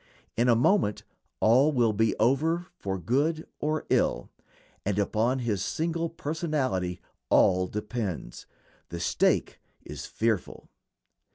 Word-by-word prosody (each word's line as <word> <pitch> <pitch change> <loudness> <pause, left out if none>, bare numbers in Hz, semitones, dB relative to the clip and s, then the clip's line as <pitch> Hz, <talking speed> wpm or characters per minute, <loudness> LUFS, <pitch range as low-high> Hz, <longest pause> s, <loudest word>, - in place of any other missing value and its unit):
In 120 +2 +2
a 120 - +6
moment 120 - +2 0.4
all 130 +7 +5
will 120 -6 +2
be 110 +1 +1
over 155 +9 +2
for 95 -1 -3
good 145 - 0
or 155 +1 -1
ill, - - +1 0.5
and 100 0 -1
upon 110 +5 +1
his 110 -6 -1
single 165 +4 -1
personality 150 - -2 0.3
all 90 0 +4
depends. 105 -3 -5 0.4
The 85 - -5
stake 85 - +1 0.3
is - - -7
fearful. 110 -5 -2
120 Hz, 115 wpm, -27 LUFS, 105-155 Hz, 0.5 s, a